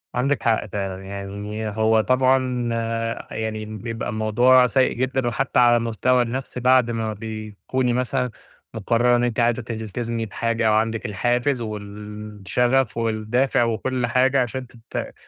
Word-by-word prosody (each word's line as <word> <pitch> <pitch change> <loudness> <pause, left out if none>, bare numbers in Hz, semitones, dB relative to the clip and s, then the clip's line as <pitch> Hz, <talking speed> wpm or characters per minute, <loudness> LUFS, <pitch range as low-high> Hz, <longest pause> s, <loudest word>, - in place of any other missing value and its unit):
عندِك 135 +3 0
حق 115 -2 +2
فعلًا، 95 -2 -4
يعني 100 +2 -5
هو 110 +1 +2
طبعًا 130 0 +2 0.6
يعني 110 -1 -3
بيبقى 110 +1 -5
الموضوع 120 +4 +4
سيء 130 +1 +2
جدًا 130 0 -1
وحتى 125 +3 0
على 120 -1 +6
المستوى 120 +2 +1
النفسي 125 +2 -3
بعد 125 -1 +4
ما 110 -1 -2
بتكُوني 110 +3 -3
مثلًا 125 +1 0 0.4
مقرّرة 115 +3 +2
إن 120 - +1
أنتِ 120 -1 -1
عايزة 120 +1 +2
تلتزمي 115 0 -4
بحاجة 115 +1 -1
أو 110 - +4
عندِك 110 +2 0
الحافز 120 +5 0
والشغف 105 +3 -2
والدافع 115 +3 +1
وكل 120 +2 -1
حاجة 130 +2 +3
عشان 125 +1 -3
ت 120 0 -7
115 Hz, 135 wpm, -23 LUFS, 110-125 Hz, 0.6 s, على